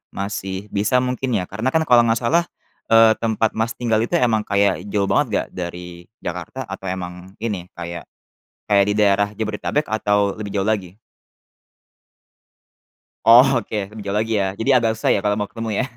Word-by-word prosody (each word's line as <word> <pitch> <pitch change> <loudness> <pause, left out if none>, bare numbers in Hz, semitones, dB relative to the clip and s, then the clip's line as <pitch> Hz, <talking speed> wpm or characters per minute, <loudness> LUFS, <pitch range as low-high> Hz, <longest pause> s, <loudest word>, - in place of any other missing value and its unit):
masih 100 -1 -4
bisa 105 +5 +2
mungkin 125 -1 -2
ya? 90 - -1
Karena 110 +6 -1
kan 160 - +4
kalau 120 -2 +6
nggak 115 0 +2
salah, 165 +8 +3 0.5
eee, 115 0 +7
tempat 110 -1 0
Mas 115 +2 -2
tinggal 115 -3 0
itu 115 - -1
emang 115 -3 +2
kayak 100 0 +2
jauh 100 -1 0
banget - - +2 0.2
gak - - -19
dari 90 -1 -7 0.2
Jakarta, 90 +10 -5
atau 95 - -7
emang 90 +1 -7
ini, 100 -6 -4
kayak, 85 -1 -7 0.6
kayak 100 -1 +4
di 105 - +1
daerah 100 -1 +3
Jabodetabek 110 +7 -2
atau 105 -2 +1
lebih 105 -2 -6
jauh 95 - +1
lagi? 100 -4 -2 2.3
Oh 120 +3 +9
oke 110 -1 -4
lebih 105 0 -9
jauh 100 +1 -1
lagi 110 +1 -1
ya. 100 - +1
Jadi 115 - -1
agak 115 -3 +3
susah - - 0
ya - - +1
kalau 105 0 +1
mau 105 - -3
ketemu 115 -1 -5
ya? - - -1
105 Hz, 175 wpm, -21 LUFS, 95-115 Hz, 2.3 s, Oh